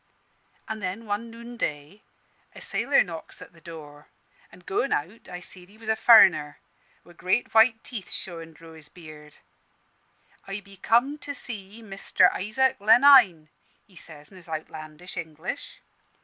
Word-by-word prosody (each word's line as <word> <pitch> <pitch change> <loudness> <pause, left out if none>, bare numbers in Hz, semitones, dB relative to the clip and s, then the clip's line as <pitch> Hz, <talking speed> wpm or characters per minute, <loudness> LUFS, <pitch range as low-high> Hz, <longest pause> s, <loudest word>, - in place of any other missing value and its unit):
An' 220 0 -5
then, 200 +3 -5
one 210 +2 -3
noonday, 215 -7 -6 0.5
a - - -10
sailor 280 - +2
knocks 165 -3 -9
at - - -13
the 165 - -20
door; 150 -3 -12 0.4
an' - - -16
goin' 255 +8 -1
out, 185 +10 -3
I 180 - -7
seed 180 0 -11
he 210 - -19
was 220 0 -9
a 220 - +3
furriner, 190 -11 +6 0.5
wi' 175 - -16
great 185 +7 -1
white 225 0 +5
teeth 220 -7 -8
showin' 165 -3 -6
dro' 165 +1 -15
his 155 -2 -11
beard. 155 -3 -14 1.1
'I 195 +1 -5
be 200 0 -17
come 245 +9 +2
to 285 -1 -6
see 220 -3 -6
Mister 195 -2 +2
Isaac 235 +6 0
Lenine,' 215 - +6 0.4
he 195 - -24
says, 150 -3 -9
in 190 - -14
his 180 -1 -15
outlandish 155 +2 -8
English. 165 - -7
190 Hz, 150 wpm, -26 LUFS, 160-225 Hz, 1.1 s, furriner